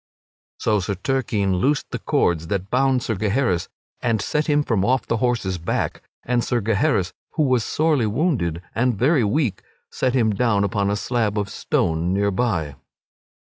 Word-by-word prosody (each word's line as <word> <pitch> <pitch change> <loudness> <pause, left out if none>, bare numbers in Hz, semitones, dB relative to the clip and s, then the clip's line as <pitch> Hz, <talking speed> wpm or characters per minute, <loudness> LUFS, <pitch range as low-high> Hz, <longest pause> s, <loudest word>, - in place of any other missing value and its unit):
So 105 -2 +1
Sir 100 +2 -2
Turquine 100 -4 0
loosed 140 +9 0
the - - -3
cords 80 -2 +1
that 100 +2 -3
bound 130 -1 +2
Sir 115 - -1
Gaheris 105 -3 0 0.3
and 115 -3 +1
set 150 +8 -1
him 150 -1 +3
from 110 -8 0
off 130 +5 +1
the 115 - 0
horse's 110 -7 0
back, 85 - -2 0.2
and 120 -1 0
Sir 120 - 0
Gaheris, 110 - +1 0.2
who 155 - +1
was 130 -4 +2
sorely 150 -6 +1
wounded 105 - 0
and 120 -1 +1
very 130 - +3
weak, 105 - 0 0.3
sat 130 0 0
him 110 -4 +3
down 105 -2 +2
upon 100 0 0
a 100 - +1
slab 110 -1 -1
of 100 -1 -1
stone 85 0 0
near 100 0 +1
by. 95 -9 -1
110 Hz, 170 wpm, -22 LUFS, 100-130 Hz, 0.3 s, him